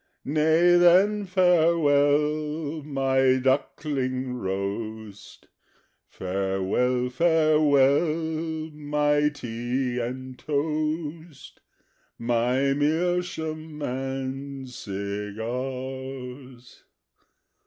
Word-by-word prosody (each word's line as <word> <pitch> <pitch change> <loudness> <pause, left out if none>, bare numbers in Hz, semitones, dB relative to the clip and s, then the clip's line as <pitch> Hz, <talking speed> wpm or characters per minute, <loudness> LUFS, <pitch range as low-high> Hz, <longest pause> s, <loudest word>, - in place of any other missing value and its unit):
Nay 160 +4 +4
then, 190 +4 +4
farewell, 155 -3 +2
my 135 -2 +2
duckling 130 -1 -1
roast, 105 0 -5 0.6
Farewell, 95 +7 -1
farewell, 155 +1 +2
my 150 0 +1
tea 125 -1 -3
and 130 +1 -5
toast, 155 +1 -3 0.6
My 125 +4 +1
meerschaum 160 0 -1
and 135 +1 -4
cigars! 125 +5 -6
140 Hz, 55 wpm, -25 LUFS, 125-155 Hz, 0.6 s, Nay